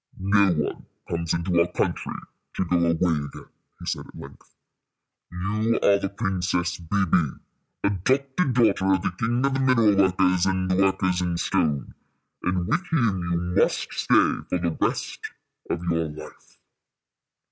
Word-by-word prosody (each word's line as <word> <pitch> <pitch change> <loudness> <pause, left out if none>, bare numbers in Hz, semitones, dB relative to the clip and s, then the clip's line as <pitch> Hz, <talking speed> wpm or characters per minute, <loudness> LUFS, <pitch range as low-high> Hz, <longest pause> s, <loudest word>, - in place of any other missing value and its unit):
"No 100 0 +3
one 75 -3 -3 0.2
comes 85 -1 -2
into 85 +1 +1
our 85 +1 +2
country - - -2 0.4
to 95 - -1
go 90 0 +1
away 85 -1 +2
again," 80 -5 -2 0.3
he - - -9
said - - -3
at - - -14
length. 70 - -13 0.8
"You 105 +6 -1
are 100 0 +5
the 100 - -2
Princess 90 -3 -1
Bébè, 85 -3 0 0.4
adopted 130 - +1
daughter 100 -5 +3
of 95 - -3
the 95 - 0
king 120 +3 +1
of 140 - +1
the 135 - 0
mineral 120 -6 +4
workers 95 -1 +3
and 95 -1 0
the - - +2
workers 95 -1 +2
in 90 -1 -1
stone, 75 -4 -1 0.5
and 90 -1 -1
with 170 - +1
him 115 - +1
you 85 - +1 0.2
must - - 0
stay - - +3
for - - +1
the 85 -2 -2
rest - - -1 0.5
of 85 - -2
your 85 -2 0
life." 75 +1 -12
95 Hz, 155 wpm, -24 LUFS, 85-100 Hz, 0.8 s, are